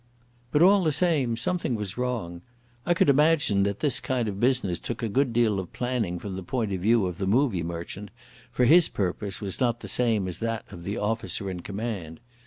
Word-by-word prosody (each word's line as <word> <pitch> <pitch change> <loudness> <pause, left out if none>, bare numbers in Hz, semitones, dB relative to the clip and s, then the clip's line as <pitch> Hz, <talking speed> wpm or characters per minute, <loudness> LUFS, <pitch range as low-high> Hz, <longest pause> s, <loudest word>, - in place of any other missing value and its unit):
But 150 - +4
all 195 +1 +6
the 155 - +2
same 145 -7 +1
something 165 -1 -1
was 105 -4 -5
wrong. 115 -9 -3 0.5
I 175 - +3
could - - +3
imagine 145 -7 +4
that 100 0 -1
this 135 -4 +2
kind 130 -4 -1
of 100 -2 -4
business 120 -8 +1
took 120 -1 -5
a - - +1
good 130 +4 +1
deal 115 -4 +2
of 95 - -7
planning 120 -8 -2
from 95 +2 -6
the 95 - -5
point 110 +2 -2
of 95 - -3
view 110 +1 +3
of 90 -2 -4
the 95 - -1
movie 115 -3 +2
merchant, 85 +4 -6 0.4
for 125 - +2
his 170 +6 +6
purpose 100 +1 -3
was 100 -3 -4
not 120 -2 0
the - - -7
same 115 -6 +2
as 90 - -4
that 115 -1 -3
of 85 - -9
the 100 +4 -3
officer 105 -2 -2
in 90 - -5
command. 100 -4 -5
115 Hz, 210 wpm, -26 LUFS, 95-125 Hz, 0.5 s, all